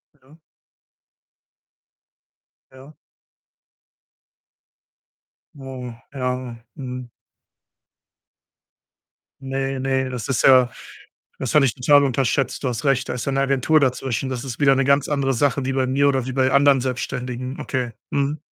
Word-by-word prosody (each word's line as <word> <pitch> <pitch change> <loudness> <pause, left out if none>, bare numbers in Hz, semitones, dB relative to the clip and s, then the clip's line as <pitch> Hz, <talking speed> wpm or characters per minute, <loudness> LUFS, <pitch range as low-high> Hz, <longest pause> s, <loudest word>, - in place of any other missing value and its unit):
Ja. 140 +2 -22 2.3
Ja. 130 +3 -15 2.6
Oh, 130 -3 -8 0.2
ja, 125 -2 -3 0.2
mhm. 125 -3 -7 2.3
Ne, 135 0 -3
ne, 130 0 0
das 125 0 -5
ist 130 -6 0
ja 130 -2 +6 0.7
das 130 - -3
hatte 150 -3 +6
ich 120 - -1
total 145 +3 +4
unterschätzt. 135 0 0
Du - - +1
hast 120 0 -4
recht, 135 -2 +1
da - - -2
ist 125 -1 -4
ja 140 - 0
'ne 135 - +1
Agentur 135 +3 +2
dazwischen, 130 -1 -1
das 125 -2 -4
ist 125 -3 -6
wieder 135 -1 +5
'ne 135 - +1
ganz 140 +1 +2
andere 140 -2 0
Sache 140 +1 +1
wie 135 - -1
bei 130 -1 0
mir 140 +2 +2
oder 135 -3 +1
wie 130 - -5
bei 130 0 +2
anderen 140 -1 +4
Selbstständigen. 125 0 -4
Okay. 125 -3 -3 0.2
Mhm. 140 +2 -1
130 Hz, 135 wpm, -22 LUFS, 125-140 Hz, 2.6 s, ja